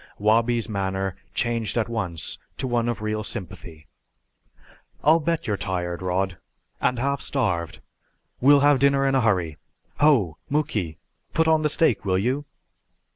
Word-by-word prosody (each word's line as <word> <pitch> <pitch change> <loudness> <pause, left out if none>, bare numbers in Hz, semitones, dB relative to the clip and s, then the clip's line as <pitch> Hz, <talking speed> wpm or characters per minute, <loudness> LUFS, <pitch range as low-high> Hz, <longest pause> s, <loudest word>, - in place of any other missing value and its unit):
Wabi's 115 +2 +2
manner 95 -2 -2 0.2
changed 115 -2 -1
at 115 - +1
once 100 -9 -3 0.2
to - - -3
one 120 -2 0
of 115 -2 -3
real 110 0 -2
sympathy. 80 -5 -7 1.2
"I'll 160 +2 +5
bet 165 0 -1
you're 105 -2 -1
tired, 90 -2 -3
Rod, 95 0 -1 0.4
and 125 - +1
half 140 +3 -1
starved. 90 - -1 0.6
We'll 140 +2 +6
have 145 -1 +5
dinner 140 0 +3
in 135 - +1
a 135 - +3
hurry. 90 -9 +1 0.4
Ho, 115 - +3
Muky, 105 - -1 0.4
put 160 0 +3
on 160 -1 +4
the 150 - +1
steak, 140 -8 +2
will 95 -2 +1
you?" 130 +9 -1
115 Hz, 145 wpm, -24 LUFS, 95-140 Hz, 1.2 s, We'll